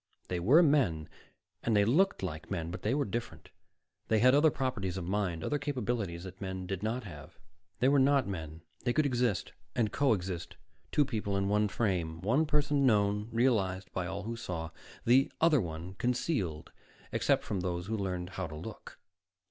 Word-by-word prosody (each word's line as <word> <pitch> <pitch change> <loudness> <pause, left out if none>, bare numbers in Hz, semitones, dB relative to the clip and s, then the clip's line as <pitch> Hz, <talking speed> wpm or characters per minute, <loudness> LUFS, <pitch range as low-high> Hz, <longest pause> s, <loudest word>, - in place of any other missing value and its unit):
They 90 - -1
were 135 - +6
men, 120 - +2 0.5
and 115 -2 +2
they 100 - +5
looked 170 - +2
like 80 -4 -5
men, 85 0 -3
but 90 - -6
they 110 +5 +1
were 145 - +1
different. 105 -7 -5 0.6
They 110 - +3
had 125 +4 +5
other 150 +3 +6
properties 115 - -2
of 95 - -3
mind, 90 -4 -1
other 145 - 0
capabilities 120 -11 -2
that 95 +1 -10
men 95 -1 -4
did 95 0 -4
not 115 +4 -2
have. 75 -7 -11 0.4
They 125 - +2
were 140 +1 +5
not 135 -2 +4
men. 80 -4 -6 0.2
They 120 - +1
could 155 +2 +2
exist, 125 -6 0 0.2
and 115 -4 +1
co 140 -4 +3
exist, 90 -3 -4 0.4
two 145 - +3
people 105 -6 -2
in 100 0 0
one 105 +1 +3
frame, 90 -6 -1
one 130 +11 +2
person 145 -1 +2
known, 105 -3 +2
realized 100 -6 +1
by 90 -1 -2
all 95 +1 -4
who 115 +3 -4
saw, 85 -7 -5 0.3
the 130 +3 +4
other 155 -5 +4
one 85 +1 -6
concealed 120 - -1 0.4
except - - +2
from 100 - -2
those 90 -1 -2
who 110 +3 -2
learned 90 -3 -3
how 95 -3 -4
to 75 - -8
look. 100 +8 -9
105 Hz, 185 wpm, -31 LUFS, 90-125 Hz, 0.6 s, were